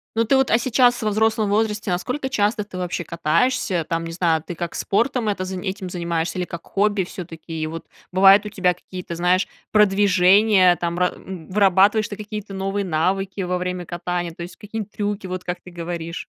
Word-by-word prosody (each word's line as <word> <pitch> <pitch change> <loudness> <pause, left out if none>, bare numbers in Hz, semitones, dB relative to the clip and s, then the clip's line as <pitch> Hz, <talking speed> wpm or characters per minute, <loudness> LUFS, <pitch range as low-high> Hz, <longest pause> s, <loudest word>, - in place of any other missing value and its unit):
Ну, 230 +1 +2
ты 270 - +3
вот, 265 -1 +2
а 225 - +6
сейчас 245 0 +3
во 215 - +1
взрослом 220 0 +1
возрасте 210 0 0
насколько 250 +10 -2
часто 210 -4 0
ты 190 -2 -9
вообще 175 -2 -3
катаешься? 170 +2 0
Там, 165 0 -1
не 165 - -5
знаю, 165 -2 +1
ты 175 - -6
как 170 +1 -5
спортом 230 +1 0
это 185 -2 -2
зани 190 +1 -4
этим 190 -1 -5
занимаешься 170 -1 -2
или 180 - 0
как 170 -1 -8
хобби 200 -2 +1
всё-таки? 165 -2 -9
И 155 - -1
вот 165 +1 -7 0.3
бывают 195 +2 +6
у - - -4
тебя 180 -2 +1
какие-то, 180 -1 -8
знаешь, 180 +2 +2 0.2
продвижения 195 -1 +5
там, 170 0 -3
ра 180 - +2
м, 180 -5 -9
вырабатываешь 200 +2 +4
ты 205 - -6
какие-то 210 -1 -7
новые 195 +1 -2
навыки 190 +4 -1
во 180 0 -1
время 180 -1 -3
катания, 175 0 -3
то 170 - -11
есть 180 +1 -10
какие-нибудь 210 0 -6
трюки, 205 -1 -3
вот 185 0 -5
как 175 0 -4
ты 180 - -13
говоришь. 170 -1 -5
185 Hz, 200 wpm, -22 LUFS, 175-210 Hz, 0.3 s, а